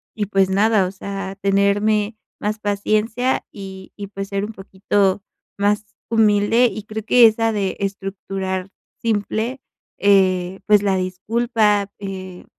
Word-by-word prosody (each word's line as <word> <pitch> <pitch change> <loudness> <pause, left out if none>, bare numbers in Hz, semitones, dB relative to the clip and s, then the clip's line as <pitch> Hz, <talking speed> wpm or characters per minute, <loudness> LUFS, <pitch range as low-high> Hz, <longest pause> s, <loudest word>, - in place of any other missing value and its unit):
y 210 - -1
pues 195 -1 +2
nada, 200 0 +3
o - - -5
sea, 195 0 -6
tenerme 205 +2 +2 0.2
más 210 +1 -2
paciencia 215 +4 0
y 190 -2 -10
y 200 -1 -7
pues 195 0 -6
ser 200 0 -1
un 220 - -8
poquito 195 0 0 0.4
más 205 +1 +1 0.2
humilde 220 +1 +4
y 210 +1 -6
creo 215 0 -6
que 240 0 +7
esa 225 +1 +1
de 200 -3 -2
estructurar 195 -1 -4 0.3
simple, 225 +3 -1 0.4
eh, 190 -2 +3
pues 210 -1 +6
la 195 -2 +2
disculpa, 205 +2 0
eh, 185 -2 -7
200 Hz, 135 wpm, -21 LUFS, 195-215 Hz, 0.4 s, que